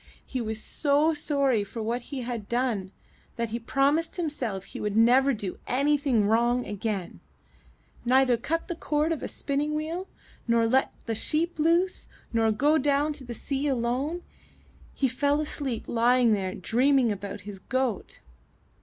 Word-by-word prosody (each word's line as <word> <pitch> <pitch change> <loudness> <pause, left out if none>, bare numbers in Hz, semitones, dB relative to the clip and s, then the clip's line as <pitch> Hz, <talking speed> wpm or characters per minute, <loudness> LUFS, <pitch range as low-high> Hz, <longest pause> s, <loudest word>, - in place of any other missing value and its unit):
He 255 - -3
was 220 -1 -3
so 295 +6 +1
sorry 280 -7 +1
for 215 +3 -8
what 235 +3 -1
he 260 +2 -6
had 235 -4 -5
done, 235 -6 -1 0.4
that 235 -1 -2
he 230 +2 -3
promised 280 +8 +1
him 340 -3 0
self 220 -10 -3
he - - -9
would 210 0 -1
never 255 +4 +5
do 205 -7 -3
anything 275 -4 +2
wrong 235 +3 +2
again 205 -2 -4 0.4
— - - -33
neither 255 0 +4
cut 325 +8 -2
the - - -2
cord 310 -1 0
of 320 - -1
the - - -4
spinning 290 +2 -2
wheel, 330 +5 -3 0.4
nor 230 -1 +3
let 260 +4 +2
the 230 - -1
sheep 315 +9 -1
loose, 340 +4 +2 0.3
nor 225 -1 +3
go 290 +8 +3
down 290 +2 +2
to 290 -2 -8
the 240 -2 -6
sea 275 +5 -2
alone. 270 +6 -1 0.7
He 270 - +2
fell 285 +3 +1
asleep 280 -6 -3
lying 240 0 +3
there 195 -3 +1
and 185 - -9
dreamed 255 +1 +3
about 200 -1 -5
his 200 0 -8
goat. 255 -1 -2
255 Hz, 165 wpm, -27 LUFS, 225-290 Hz, 0.7 s, never